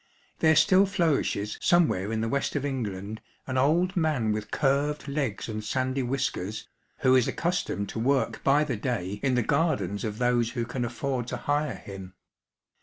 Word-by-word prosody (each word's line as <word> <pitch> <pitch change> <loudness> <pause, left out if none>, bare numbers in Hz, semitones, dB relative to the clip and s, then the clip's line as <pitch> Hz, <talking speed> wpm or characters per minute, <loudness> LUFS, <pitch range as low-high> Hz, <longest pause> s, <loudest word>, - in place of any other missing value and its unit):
There 160 0 +5
still 190 +5 +5
flourishes 155 - 0
somewhere 130 - +3
in 110 -1 -1
the 115 - 0
West 140 +4 -1
of 145 -1 -1
England 110 -6 -4 0.2
an 130 - -4
old 165 +8 +2
man 150 - +1
with 105 0 -3
curved 145 +1 0
legs 140 -8 -2
and 110 -1 -4
sandy 130 +3 -1
whiskers, 125 -6 -2 0.3
who 130 - +4
is 130 -2 +4
accustomed 170 - -1
to - - -4
work 135 +3 0
by 145 +2 +4
the 135 -7 -2
day 105 -4 -3
in 130 -2 +1
the 120 - +2
gardens 120 - 0
of 105 -2 -3
those 120 -1 +1
who 120 -2 -2
can 125 +1 -3
afford 120 +1 -3
to 125 - -3
hire 145 +2 -1
him. 95 -2 -10
130 Hz, 175 wpm, -27 LUFS, 110-145 Hz, 0.3 s, There